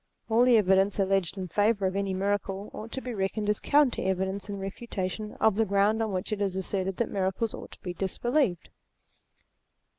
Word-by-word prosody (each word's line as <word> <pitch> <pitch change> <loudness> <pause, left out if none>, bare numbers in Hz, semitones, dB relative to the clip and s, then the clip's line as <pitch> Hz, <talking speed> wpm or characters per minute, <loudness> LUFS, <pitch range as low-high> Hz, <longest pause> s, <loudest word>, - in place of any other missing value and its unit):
All 235 +2 +5
the 245 -2 +6
evidence 195 -1 +3
alleged 195 -2 +1
in 185 -1 -4
favour 205 +3 +2
of 185 0 0
any 200 -1 -1
miracle 195 +1 -2
ought 225 +2 -8
to 265 - -3
be 250 -2 -5
reckoned 205 +1 -2
as 210 - +2
counter 290 -4 +3
evidence 190 +1 -1
in 200 - -4
refutation 195 0 -4
of 220 -3 +2
the 225 - +4
ground 205 +2 +2
on 220 -2 -1
which 185 +3 -2
it 205 - -3
is 195 -2 0
asserted 190 0 -2
that 235 - -1
miracles 195 +3 -1
ought - - -8
to - - -16
be 180 -2 -4
disbelieved. 195 - 0
200 Hz, 190 wpm, -28 LUFS, 190-220 Hz, -, the